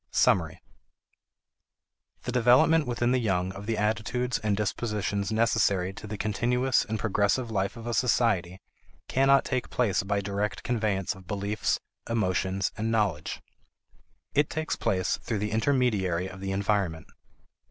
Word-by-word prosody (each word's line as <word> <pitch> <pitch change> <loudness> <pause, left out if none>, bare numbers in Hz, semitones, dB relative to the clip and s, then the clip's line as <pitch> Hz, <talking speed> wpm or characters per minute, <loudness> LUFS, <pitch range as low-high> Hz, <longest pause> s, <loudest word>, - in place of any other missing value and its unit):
Summary. 80 -4 +2 1.6
The 125 - -3
development 130 +6 +4
within 120 0 0
the 130 - +3
young 95 -5 0
of 100 +2 -9
the 115 -1 0
attitudes 110 +4 0
and 105 -2 0
dispositions 105 -1 -2
necessary 105 -4 +2
to 105 - -9
the 105 0 -5
continuous 125 +5 +1
and 110 -1 -3
progressive 105 +3 +1
life 100 +2 -1
of 115 - -9
a 120 - -2
society 105 -7 +1 0.5
cannot 135 +1 +4
take 130 -2 -2
place 115 -6 +1
by 100 +2 -1
direct 100 +1 -3
conveyance 110 -5 0
of 95 -3 -15
beliefs, 105 +2 -1 0.3
emotions, 95 -3 0
and 110 +2 -2
knowledge. 105 -9 -1 0.9
It 145 0 +2
takes 155 0 -2
place 95 -5 0
through 110 - -3
the 105 +1 -2
intermediary 110 -7 +1
of 95 0 -10
the 95 0 -3
environment. 95 -5 0
105 Hz, 140 wpm, -27 LUFS, 95-120 Hz, 1.6 s, development